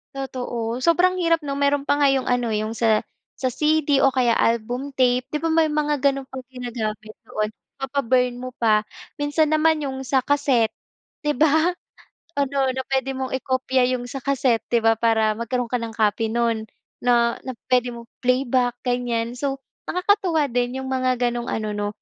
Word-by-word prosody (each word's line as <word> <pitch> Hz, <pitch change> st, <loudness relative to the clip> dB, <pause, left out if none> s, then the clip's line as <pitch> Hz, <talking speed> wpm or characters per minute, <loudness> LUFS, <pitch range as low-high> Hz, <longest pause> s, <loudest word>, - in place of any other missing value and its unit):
Totoo. 245 Hz, -3 st, -3 dB
Sobrang 360 Hz, +5 st, +3 dB
hirap 335 Hz, -2 st, +2 dB
'no, 280 Hz, -1 st, -3 dB
meron 280 Hz, 0 st, +2 dB
pa 285 Hz, +1 st, +1 dB
nga 285 Hz, -, +5 dB
yung 270 Hz, -1 st, +1 dB
ano, 245 Hz, -1 st, +1 dB
yung 215 Hz, +1 st, -1 dB
sa 225 Hz, -2 st, +2 dB, 0.3 s
sa 255 Hz, -1 st, -1 dB
CD 300 Hz, -2 st, +2 dB
o 270 Hz, -, +6 dB
kaya 250 Hz, -3 st, +2 dB
album 240 Hz, +5 st, 0 dB
tape, 250 Hz, -1 st, +2 dB
'di 300 Hz, -, -1 dB
ba 325 Hz, -, +1 dB
may 320 Hz, -1 st, +4 dB
mga 300 Hz, -1 st, 0 dB
ganun 275 Hz, -1 st, +1 dB
pang 265 Hz, -1 st, -8 dB
ginagamit 225 Hz, -4 st, -5 dB
noon, 215 Hz, 0 st, -2 dB, 0.3 s
ipapa-burn 255 Hz, -2 st, +1 dB
mo 255 Hz, 0 st, -5 dB
pa. 215 Hz, -2 st, +3 dB, 0.4 s
Minsan 295 Hz, +1 st, +1 dB
naman 310 Hz, -1 st, +3 dB
yung 265 Hz, -1 st, -4 dB
sa 265 Hz, -2 st, +2 dB
cassette 270 Hz, -6 st, +2 dB, 0.5 s
di 295 Hz, -2 st, 0 dB
ba? 315 Hz, +4 st, +3 dB, 0.7 s
Ano 275 Hz, -1 st, +1 dB
na 260 Hz, +1 st, -3 dB
pwede 265 Hz, 0 st, +1 dB
mong 260 Hz, -1 st, -4 dB
i-kopya 260 Hz, -1 st, +1 dB
yung 245 Hz, -, -7 dB
sa 270 Hz, +2 st, -6 dB
cassette 255 Hz, -5 st, +1 dB
'di 235 Hz, -2 st, +1 dB
ba 225 Hz, 0 st, +5 dB
para 220 Hz, -1 st, +2 dB
magkaroon 235 Hz, +1 st, -2 dB
ka 245 Hz, -1 st, 0 dB
ng 225 Hz, -1 st, -5 dB
copy 220 Hz, +1 st, +1 dB
nun, 230 Hz, -2 st, 0 dB, 0.3 s
na 235 Hz, -1 st, +2 dB
na 260 Hz, -, -5 dB, 0.2 s
pwede 250 Hz, -1 st, +3 dB
mong 235 Hz, 0 st, -10 dB
i-playback, 250 Hz, -1 st, +1 dB
ganyan. 245 Hz, -1 st, -1 dB
So 275 Hz, +1 st, -2 dB, 0.3 s
nakakatuwa 360 Hz, -5 st, +2 dB
din 245 Hz, +1 st, 0 dB
yung 265 Hz, -, -6 dB
mga 255 Hz, -1 st, +1 dB
ganong 240 Hz, 0 st, -4 dB
ano 215 Hz, -1 st, -2 dB
'no, 205 Hz, 0 st, -2 dB
255 Hz, 175 wpm, -23 LUFS, 235-280 Hz, 0.7 s, o